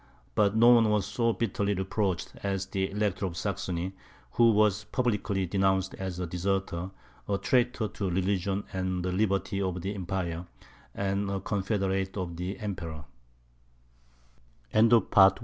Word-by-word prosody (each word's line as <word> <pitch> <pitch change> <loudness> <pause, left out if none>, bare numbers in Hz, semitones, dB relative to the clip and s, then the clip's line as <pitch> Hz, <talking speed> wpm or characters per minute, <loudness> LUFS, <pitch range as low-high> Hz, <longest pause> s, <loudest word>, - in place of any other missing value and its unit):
But 105 0 +3
no 115 +2 +7
one 115 -3 +6
was 105 -2 +2
so 115 -1 +1
bitterly 100 -3 -1
reproached 95 -1 -1
as 95 -1 -1
the 95 0 -2
Elector 100 -1 -1
of 85 -2 -7
Saxony, 95 -2 -2 0.4
who 115 - +5
was 105 0 +3
publicly 105 -5 0
denounced 95 +1 +1
as 95 -2 -5
a 90 - -1
deserter, 90 0 -2 0.4
a 100 - +2
traitor 125 -1 +1
to 100 -2 -3
religion 95 +2 0
and 95 -1 -2
the 90 - 0
liberties 100 0 0
of 90 -2 -1
the 100 +2 -2
Empire, 90 -3 -3 0.5
and 100 0 -1
a 100 0 -1
confeder 100 0 -1
95 Hz, 125 wpm, -29 LUFS, 95-105 Hz, 0.5 s, no